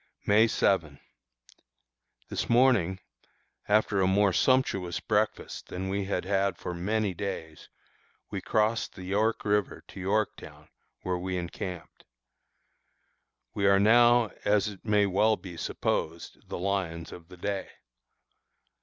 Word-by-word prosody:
May 110 +3 +5
7. 80 -9 +1 1.3
This - - -3
morning, 115 -7 +3 0.7
after 105 -1 +2
a 95 - +3
more 100 0 +3
sumptuous 100 -10 +1
breakfast 105 -1 -1
than 95 +1 -5
we 100 0 -1
had 95 -2 -2
had 100 0 0
for 90 - -5
many 100 +3 -1
days, 85 -5 -6 0.6
we - - -3
crossed 110 +1 0
the 95 - -9
York 105 +5 0
River 105 -1 0
to - - -10
Yorktown, 105 +3 -3 0.3
where 90 -1 -1
we 90 +1 -3
encamped. 90 0 -7 1.5
We 100 -1 +1
are 100 0 +5
now, 120 +2 +5
as 105 +1 +2
it 100 -3 -12
may 105 -2 +3
well 105 +3 +3
be 90 -1 -10
supposed, 80 0 -3
the - - -4
"lions 90 -3 -2
of 85 -2 -11
the 90 - -13
day." 100 +2 -3
100 Hz, 125 wpm, -28 LUFS, 90-105 Hz, 1.5 s, May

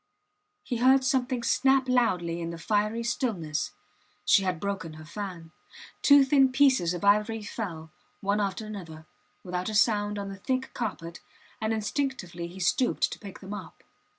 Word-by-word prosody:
He 245 - -3
heard 260 +2 +5
something 255 -1 0
snap 265 +1 +3
loudly 180 -9 +1
in 165 - -3
the 170 - -6
fiery 215 +5 0
stillness. 195 - -1 0.6
She 200 - +6
had 185 -3 -1
broken 195 -4 -4
her 155 0 -11
fan. 170 -2 -7 0.5
Two 285 -1 +7
thin 270 -1 +4
pieces 260 -11 +3
of 175 - -4
ivory 210 +2 +3
fell, 165 -8 -6 0.3
one 205 +1 0
after 200 +2 -2
another, 165 -7 -8 0.4
without 180 +1 -3
a 215 - -3
sound, 210 -1 +2
on 200 -1 -4
the 195 - -7
thick 260 +6 -2
carpet, 175 -8 -5 0.4
and 220 0 0
instinctively 215 - -2
he 180 +3 -11
stooped 240 +7 +1
to - - -7
pick 200 -3 -10
them 195 +1 -7
up. 205 - -9
205 Hz, 160 wpm, -28 LUFS, 180-245 Hz, 0.6 s, Two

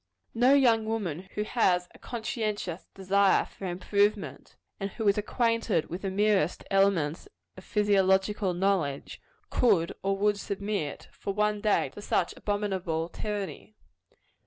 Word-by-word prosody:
No 250 +4 +5
young 230 -5 +4
woman 190 -5 -3
who 210 - 0
has 185 -6 +1
a - - -17
conscientious 215 -6 -4
desire 195 +1 +3
for 195 - -8
improvement, 200 +3 -1 0.2
and 195 - -2
who 220 +1 -3
is 200 - +5
acquainted 230 -5 0
with 180 +3 -4
the 195 - -2
merest 195 -3 +1
elements 195 -6 +2 0.3
of 185 - -12
physiological 195 -1 +2
knowledge, 175 -7 -1 0.3
could 195 -9 +3
or 195 0 0
would 205 0 +1
submit, 200 -7 -3
for 200 - -5
one 210 0 +1
day, 210 -1 +2
to - - -11
such 180 -3 0
abominable 190 -6 -2
tyranny. 210 +1 -5
200 Hz, 135 wpm, -28 LUFS, 185-210 Hz, 0.3 s, No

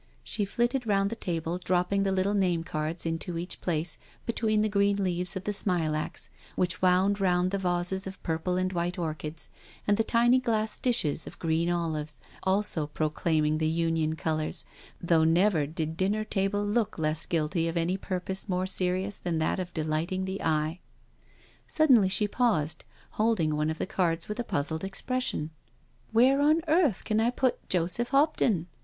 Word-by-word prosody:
She 205 - +1
flitted 240 +4 -1
round 200 0 +2
the - - -3
table^ 175 -2 -3
dropping 180 +2 +1
the 195 -1 +1
little 190 +1 +1
name 180 -5 +1
cards 155 +1 -3
into 165 +1 -2
each 175 +2 -5
place 165 -1 -2 0.3
between 220 -2 +1
the 215 - +2
green 200 -1 +2
leaves 180 +1 -1
of 190 - -4
the 210 - -2
smilax, 160 -6 -1 0.2
which 180 -2 0
wound 190 +2 +3
round 180 -1 +2
the 200 - -1
vases 180 +1 -1
of 190 - -9
purple 165 +2 -1
and 185 0 -1
white 175 +2 -2
orchids, 155 -2 -4 0.4
and 205 0 +3
the 225 - +3
tiny 240 +3 +4
glass 220 -3 -1
dishes 170 - +1
of - - -10
green 165 +1 0
olives 155 -4 -2 0.2
also 190 -5 +1
proclaiming 155 0 0
the 155 - +1
Union 160 -1 0
colours, 155 -1 -1 0.3
though 165 -2 +3
never 165 -1 +3
did 160 +1 -3
dinner 205 +3 +1
table 205 -1 -1
look 215 +1 0
less 155 0 -1
guilty 165 +1 0
of 165 +1 -2
any 170 +2 +1
purpose 190 +1 -2
more 185 0 0
serious 185 +1 +1
than 175 -2 -2
that 160 +3 0
of 180 -1 -4
delighting 165 +4 -1
the 190 +1 -4
eye. 155 +2 0 0.9
Suddenly 255 -11 +4
she 210 +2 +3
paused, 170 -10 0 0.3
holding 210 -9 +1
one 150 +1 0
of 160 - -3
the - - -2
cards 170 -3 0
with 210 +3 -5
a - - 0
puzzled 160 -3 -2
expression. 195 -4 -2 0.3
" - - -36
Where 255 +5 +4
on 305 +3 +4
earth 310 - +2
can 215 -1 0
I 225 +2 +3
put 255 +1 -1
Joseph 180 +6 +1
Hopton? 275 - +2
180 Hz, 175 wpm, -28 LUFS, 160-205 Hz, 0.9 s, tiny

